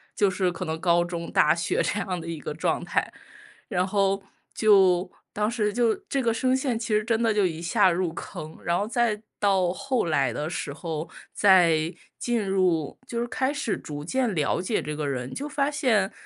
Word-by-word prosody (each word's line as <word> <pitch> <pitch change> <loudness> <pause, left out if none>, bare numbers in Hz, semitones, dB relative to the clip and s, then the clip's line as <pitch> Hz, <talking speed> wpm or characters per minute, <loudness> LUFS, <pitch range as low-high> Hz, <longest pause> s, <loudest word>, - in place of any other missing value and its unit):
就 205 - +3
是 185 -1 0
可 170 - -5
能 160 0 -3
高 170 0 +3
中、 170 -1 -5
大 155 +2 +4
学 170 - 0
这 210 - -1
样 180 -5 -3
的 165 - -9
一 165 -2 -4
个 150 - -5
状 155 - -1
态。 - - -1 0.6
然 185 -4 0
后 195 0 +1 0.3
就 190 -4 +4 0.2
当 210 +1 0
时 210 -3 -1
就 235 0 +2
这 275 - 0
个 230 -2 +2
声 255 +3 +1
线 260 -3 0
其 225 - -5
实 210 - +2
真 230 0 0
的 225 -1 +3
就 205 -2 +2
一 160 -2 -5
下 190 +3 +3
入 175 -1 -1
坑， 155 -1 -8
然 170 0 +1
后 205 - -1
再 235 -3 0 0.2
到 190 -3 +2
后 255 0 -1
来 140 -6 +1
的 150 +6 -3
时 145 - -4
候， 160 +1 -5 0.2
再 170 -5 +4 0.3
进 235 -3 0
入 180 -6 +1
就 235 - -3
是 240 - 0
开 260 +3 0
始 280 -7 -1
逐 145 0 -7
渐 250 +2 0
了 155 +2 +1
解 200 +4 -1
这 150 - -4
个 150 -1 -2
人， 130 -2 -3
就 285 - -4
发 285 -1 0
现 230 -10 +2
190 Hz, 220 characters per minute, -26 LUFS, 165-225 Hz, 0.6 s, 大